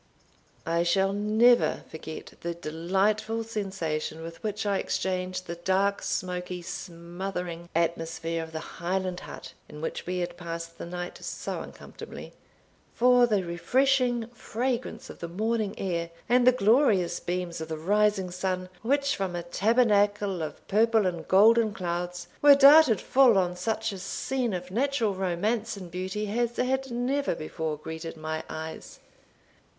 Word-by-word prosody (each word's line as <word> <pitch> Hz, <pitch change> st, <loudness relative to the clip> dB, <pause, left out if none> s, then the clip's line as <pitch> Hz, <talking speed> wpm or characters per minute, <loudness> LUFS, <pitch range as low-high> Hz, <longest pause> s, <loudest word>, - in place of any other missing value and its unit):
I 170 Hz, +1 st, +1 dB
shall 190 Hz, +3 st, +2 dB
never 220 Hz, +4 st, +3 dB
forget 160 Hz, 0 st, -8 dB
the 170 Hz, 0 st, -3 dB
delightful 190 Hz, +7 st, 0 dB
sensation 180 Hz, -8 st, -3 dB
with 165 Hz, 0 st, -9 dB
which 210 Hz, -1 st, -3 dB
I 200 Hz, -1 st, +1 dB
exchanged 185 Hz, 0 st, -2 dB
the 170 Hz, 0 st, -6 dB
dark, 190 Hz, +3 st, +1 dB
smoky, 180 Hz, -1 st, -3 dB
smothering 175 Hz, 0 st, -6 dB
atmosphere 165 Hz, 0 st, -1 dB
of 160 Hz, 0 st, -7 dB
the 160 Hz, 0 st, -8 dB
Highland 185 Hz, +1 st, -1 dB
hut, -, -, -10 dB, 0.2 s
in 150 Hz, -, -10 dB
which 160 Hz, -, -4 dB
we 180 Hz, 0 st, -1 dB
had 175 Hz, -1 st, -3 dB
passed 165 Hz, -1 st, -6 dB
the -, -, -6 dB
night 175 Hz, 0 st, -6 dB
so -, -, -4 dB
uncomfortably, -, -, -10 dB, 0.6 s
for 245 Hz, 0 st, +5 dB
the 205 Hz, -4 st, +1 dB
refreshing 245 Hz, +7 st, +1 dB
fragrance 240 Hz, +1 st, -3 dB
of -, -, -14 dB
the 170 Hz, -, -4 dB
morning 215 Hz, +3 st, -1 dB
air, 170 Hz, -3 st, -2 dB, 0.2 s
and 245 Hz, +1 st, +4 dB
the -, -, +10 dB
glorious 215 Hz, -7 st, +3 dB
beams 175 Hz, -2 st, -3 dB
of 160 Hz, -, -4 dB
the 160 Hz, -1 st, -4 dB
rising 200 Hz, +2 st, +2 dB
sun, 185 Hz, 0 st, -2 dB
which, 280 Hz, +4 st, +1 dB
from 190 Hz, -3 st, -3 dB
a 175 Hz, -, -3 dB
tabernacle 205 Hz, -1 st, +2 dB
of 155 Hz, -2 st, -6 dB
purple 220 Hz, 0 st, +3 dB
and 170 Hz, -3 st, -2 dB
golden 215 Hz, +2 st, +5 dB
clouds, 175 Hz, 0 st, -3 dB
were 290 Hz, -1 st, +9 dB
darted 280 Hz, -, +8 dB
full 255 Hz, -5 st, +5 dB
on 180 Hz, -1 st, +1 dB
such 220 Hz, +4 st, -1 dB
a 195 Hz, -, -7 dB
scene 235 Hz, +3 st, -2 dB
of 180 Hz, 0 st, -6 dB
natural 245 Hz, -2 st, +1 dB
romance 195 Hz, +4 st, -1 dB
and 180 Hz, -3 st, -9 dB
beauty 190 Hz, +4 st, -3 dB
as 240 Hz, 0 st, 0 dB
had 265 Hz, +1 st, 0 dB
never 250 Hz, -1 st, 0 dB
before 155 Hz, 0 st, -4 dB
greeted 160 Hz, +2 st, -7 dB
my 155 Hz, 0 st, -3 dB
eyes. 160 Hz, 0 st, -7 dB
190 Hz, 145 wpm, -27 LUFS, 170-225 Hz, 0.6 s, the